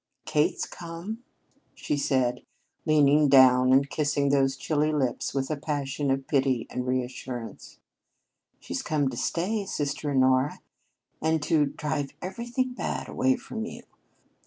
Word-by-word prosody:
"Kate's 150 0 +1
come," 175 +7 -7 0.5
she - - -2
said, 130 -3 0 0.5
leaning 150 -1 +5
down 130 -1 +6
and 135 +1 +5
kissing 145 -1 0
those 135 -1 +2
chilly 155 +1 0
lips 135 -5 -1
with 135 +1 -2
a - - +1
passion 145 -1 -2
of 135 0 0
pity 130 -4 +1
and 125 0 -3
reassurance. 125 -2 -4 0.8
"She's - - -4
come 145 -3 0
to - - -7
stay, 200 +5 -1
sister 145 -2 -2
Honora, 130 +1 +2 0.6
and 160 0 +2
to 150 -3 +3
drive 145 0 -3
everything 240 +7 -3
bad - - -4
away 265 0 +2
from 240 -3 -6
you. - - -9
145 Hz, 135 wpm, -27 LUFS, 135-160 Hz, 0.8 s, down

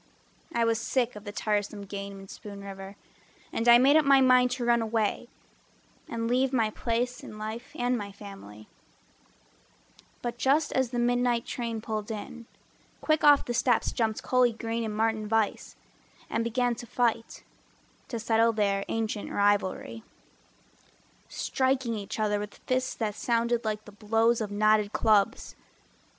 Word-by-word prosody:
I 235 -1 +1
was 230 -1 +1
sick 245 0 0
of 210 +1 -10
the 205 - -5
tiresome 205 -1 -2
game 200 0 -7
in 195 - -12
Spoon 200 0 -10
River 195 0 -8 0.6
And 230 - -1
I 240 0 +9
made 270 +4 +5
up 315 - +6
my 275 -1 +6
mind 255 -1 +5
to 245 - -3
run 235 -1 +3
away 220 -1 -1 0.8
And 230 0 -2
leave 255 +2 +2
my 225 -5 +1
place 240 +3 -2
in 215 - -9
life 220 +3 -6
and 245 +1 0
my 205 -3 -5
family; 195 - -12 1.6
But 240 0 -4
just 290 +4 +2
as 260 -2 +1
the 245 - -4
midnight 245 0 +1
train 230 -2 -4
pulled 215 -1 -4
in, 230 +2 -7 0.5
Quick 310 -1 +1
off 290 -1 +6
the 240 - -3
steps 240 -1 +2
jumped 220 -2 -1
Cully 250 -2 +3
Green 230 +1 -3
And 215 -1 -4
Martin 220 -1 0
Vise, 220 -1 -1 0.6
and 230 - 0
began 245 +1 0
to 240 - -8
fight 230 -1 -1 0.6
To - - -4
settle 225 0 +2
their 200 -2 +1
ancient 220 -2 -3
rivalry, 200 - 0 1.3
Striking 260 -2 0
each 205 0 -5
other 210 -1 +1
with 205 0 -7
fists 255 0 -1
that 215 -3 -2
sounded 235 +2 0
Like 215 -1 -3
the 210 - -12
blows 225 +3 +1
of 215 - -2
knotted 210 0 +2
clubs. 200 - +2
225 Hz, 155 wpm, -28 LUFS, 210-240 Hz, 1.6 s, I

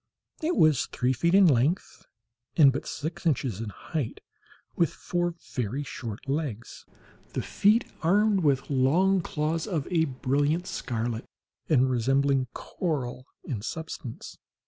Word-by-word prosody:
It 330 +2 0
was 155 -4 +4
three 125 +1 0
feet 170 +9 +2
in 200 -1 +7
length, 150 +4 +1 0.5
and 140 -5 +7
but 140 - -4
six 160 +3 -4
inches 125 - 0
in 115 - -4
height, 140 +4 -4 0.6
with 170 - +2
four 175 -1 -2 0.2
very 125 +4 -2
short 115 -4 -7
legs, 135 -6 -4 0.5
the - - -2
feet 215 +4 +3 0.2
armed 205 +4 +3
with 140 -4 +1
long 175 +9 +3
claws 160 +1 -2
of 160 -8 -2
a 165 -2 +3
brilliant 145 +5 0
scarlet, 115 -6 -3 0.4
and 130 -4 +4
resembling 135 +2 +2
coral 130 -8 -4 0.2
in 115 -7 -4
substance. 145 -2 -7
145 Hz, 130 wpm, -27 LUFS, 130-170 Hz, 0.6 s, in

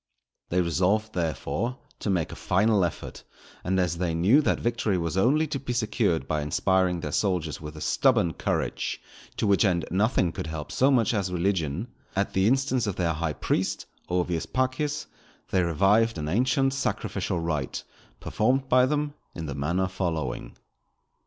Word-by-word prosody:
_" - - -45
They 90 +1 +2
resolved, 95 +6 +1
therefore, 90 - -2 0.2
to - - -3
make 90 -5 0
a - - -7
final 100 +2 +2
effort; 85 - -4 0.4
and 95 +2 +1
as 85 -2 0
they 85 -3 0
knew 100 - +5
that - - +1
victory 115 -4 0
was 85 0 -2
only 135 +11 +3
to 145 -2 -3
be 125 -2 -4
secured 105 - 0
by 75 +1 0
inspiring 90 +4 +1
their 75 - -4
soldiers 85 -6 -1
with 75 0 -8
a - - -8
stubborn 85 +1 +2
courage, - - -2 0.4
to - - 0
which 100 0 +4
end 90 -5 +2
nothing 95 -2 +2
could - - -5
help 80 -2 -5
so 135 - +3
much 120 -5 +3
as 100 -4 -1
religion, 90 - -1 0.3
at 100 +1 0
the 95 +1 +3
instance 130 -2 +2
of 100 - -2
their 85 -2 0
high 80 0 -2
priest, - - -1 0.2
Ovius 90 -2 -1
Paccius, 130 +3 -1 0.5
they 95 - +3
revived 100 +7 +3
an 75 -1 -3
ancient 130 - +2
sacrificial 105 -7 -2
rite 75 -5 -2 0.4
performed 130 +4 0
by 125 0 +5
them 145 0 -1 0.2
in 80 - -5
the 70 - -4
manner 85 +7 0
following. 85 -8 -3
95 Hz, 170 wpm, -26 LUFS, 85-115 Hz, 0.5 s, knew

